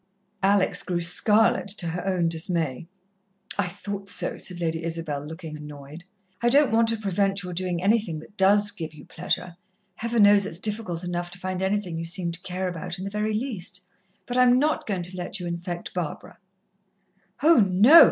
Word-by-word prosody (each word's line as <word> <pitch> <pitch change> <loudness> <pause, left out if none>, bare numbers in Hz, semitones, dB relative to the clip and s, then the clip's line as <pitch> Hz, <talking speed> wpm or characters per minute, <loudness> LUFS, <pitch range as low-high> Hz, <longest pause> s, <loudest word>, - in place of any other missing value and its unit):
Alex 195 0 +3
grew 175 -1 -2
scarlet, 195 +3 +3
to 195 -2 -2
her 175 +2 -3
own 180 -3 +1
dismay. 165 -3 -1 0.7
"I 190 - +2
thought 200 +1 -6
so," - - -2
said 180 -2 -5
Lady 165 -1 -2
Isabel, 165 -4 -3
looking 160 +1 -8
annoyed. 150 +2 -10 0.4
"I 240 - +3
don't 285 +1 +5
want 225 0 +4
to 225 0 +3
prevent 195 -1 0
your 180 0 -5
doing 180 0 -2
anything 205 -5 +2
that 155 +6 -12
does 205 +1 +4
give 160 -2 -7
you 145 - -13
pleasure 175 0 -3 0.4
Heaven 230 -1 +2
knows 205 -1 +6
it's 165 - -6
difficult 190 -3 -2
enough 175 0 -3
to 180 - -10
find 185 0 -3
anything 190 -4 -1
you 165 - -4
seem 170 0 -2
to 170 +1 -5
care 185 +1 -3
about 175 0 -5
in 185 - -6
the 195 - -4
very 210 +1 -1
least 210 -7 -3 0.4
but 245 - -3
I - - +6
am 250 0 +6
not 300 +3 +1
goin' 190 -4 -1
to 180 +2 -4
let 180 +2 -4
you 180 - -5
infect 175 0 -5
Barbara." 175 -5 -5 1.0
"Oh, 330 0 +7
no!" 210 - +7
185 Hz, 190 wpm, -25 LUFS, 170-205 Hz, 1.0 s, Oh